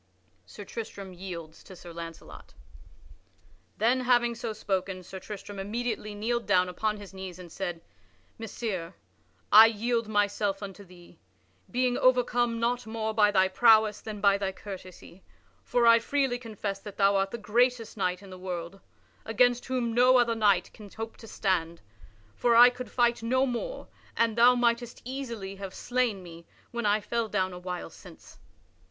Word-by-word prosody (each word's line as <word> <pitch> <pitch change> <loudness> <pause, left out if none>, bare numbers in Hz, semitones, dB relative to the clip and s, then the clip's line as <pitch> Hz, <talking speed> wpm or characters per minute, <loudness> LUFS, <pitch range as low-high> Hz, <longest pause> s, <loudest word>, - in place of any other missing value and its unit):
[Sidenote: - - -22
Sir 205 -2 -11
Tristram 200 -4 -7
yields 170 -3 -8
to 190 - -12
Sir 175 -1 -11
Launcelot] 165 0 -10 1.2
Then, 240 +4 +2
having 240 -1 +2
so 230 -1 -5
spoken, 190 -3 -3
Sir 190 +2 -9
Tristram 205 0 -8
immediately 215 +1 -3
kneeled 235 +3 -2
down 185 -2 +3
upon 210 +4 -2
his 200 -2 -11
knees 190 -2 -8
and 180 -2 -11
said: 175 -3 -4 0.6
"Messire, 200 -6 -5 0.6
I 220 +1 +10
yield 230 +1 -1
myself 205 -1 0
unto 200 0 -8
thee, 175 -2 -17 0.5
being 250 0 0
overcome 245 -2 +2
not 240 +1 -1
more 220 0 -3
by 210 -1 +4
thy 190 -2 +3
prowess 220 +1 +4
than 215 -2 -7
by 200 -1 +4
thy 195 -1 -1
courtesy. 190 -2 -11 0.4
For 245 -1 +1
I 230 0 +7
freely 265 0 0
confess 210 -4 -5
that 205 0 -10
thou 200 0 +4
art 195 0 +1
the 235 - -5
greatest 235 +2 +1
knight 185 -1 -2
in 195 - -12
the 185 - -10
world, 180 0 -6 0.4
against 245 +2 +2
whom 250 -3 -1
no 250 +2 +5
other 240 -1 +3
knight 205 -5 +2
can 210 -2 -12
hope 225 +2 -7
to 225 - -12
stand; 170 -6 -1 0.5
for 235 - +2
I 245 +1 +9
could 250 0 -8
fight 240 -1 +1
no 260 +3 +2
more 265 - -4 0.3
and 230 -1 +2
thou 240 +2 +6
mightest 240 0 0
easily 235 -7 -6
have 195 -1 -7
slain 245 -6 -1
me 170 -1 -12 0.2
when 235 -3 -2
I 210 +1 +2
fell 235 +1 -2
down 185 -3 -1
a 180 - -8
while 180 0 -6
since." - - -15
215 Hz, 165 wpm, -28 LUFS, 190-235 Hz, 1.2 s, I